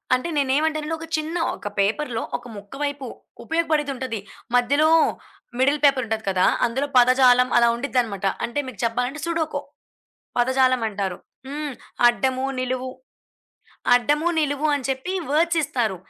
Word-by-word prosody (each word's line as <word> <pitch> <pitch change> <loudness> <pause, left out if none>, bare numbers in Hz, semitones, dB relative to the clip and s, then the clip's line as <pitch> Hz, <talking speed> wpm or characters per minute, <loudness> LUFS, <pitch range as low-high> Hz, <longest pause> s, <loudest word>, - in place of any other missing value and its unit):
అంటే 255 +7 -3
నేనేమంటానంటే, 300 +3 0
ఒక 325 - -8
చిన్న 310 +2 -4 0.2
ఒక - - -8
పేపర్‌లో 225 +4 0
ఒక - - -18
ముక్క 200 0 -12
వైపు 285 -2 -3 0.4
ఉపయోగపడేదుంటది. 295 -7 -1 0.4
మధ్యలో 285 +6 +3 0.7
మిడిల్ 280 +3 +3
పేపరుంటది 230 -6 +1
కదా! 185 -1 +2 0.2
అందులో 265 +5 -2
పదజాలం 250 0 +5
అలా 235 0 +5
ఉంటదనమాట. 235 -6 -1 0.2
అంటే 240 +5 -3
మీకు 225 -7 -9
జెప్పాలంటే 250 +5 -2
సుడోకో, 330 -2 -2 0.8
పదజాలం 255 0 +3
అంటారు. 195 -3 -3 0.3
హ్మ్. 295 0 -4 0.3
అడ్డము, 260 +2 0 0.2
నిలువు 255 0 -2 1.0
అడ్డము, 295 +7 +2
నిలువు 290 0 0
అని 280 -3 -3
చెప్పి 265 +8 -3 0.2
వర్డ్స్ 335 +3 +2
ఇస్తారు. 230 -8 -1
260 Hz, 125 wpm, -23 LUFS, 240-295 Hz, 1.0 s, పదజాలం